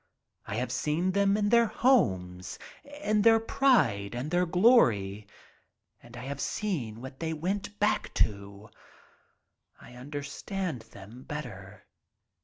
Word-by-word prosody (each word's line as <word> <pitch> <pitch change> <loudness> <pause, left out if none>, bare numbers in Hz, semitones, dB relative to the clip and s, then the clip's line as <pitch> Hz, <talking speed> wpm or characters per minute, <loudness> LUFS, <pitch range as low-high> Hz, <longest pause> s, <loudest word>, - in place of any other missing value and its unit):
I 100 - -4
have 120 +2 -2
seen 165 +8 0
them 200 +1 +2
in 205 -1 +1
their 235 0 +5
homes, 95 - +1 0.5
in 210 0 +2
their 225 +1 +6
pride 120 - +2
and 130 +6 -4
their 175 0 +2
glory 115 - +3 0.7
and 120 0 -13
I - - -7
have 140 +1 -5
seen 130 - -3
what 130 0 -9
they 160 -1 -2
went 200 +6 -3
back 210 - 0
to. 100 0 -2 1.1
I - - -14
understand 145 - -5
them 105 +6 -12
better." 105 -9 -8
145 Hz, 125 wpm, -29 LUFS, -, 1.1 s, their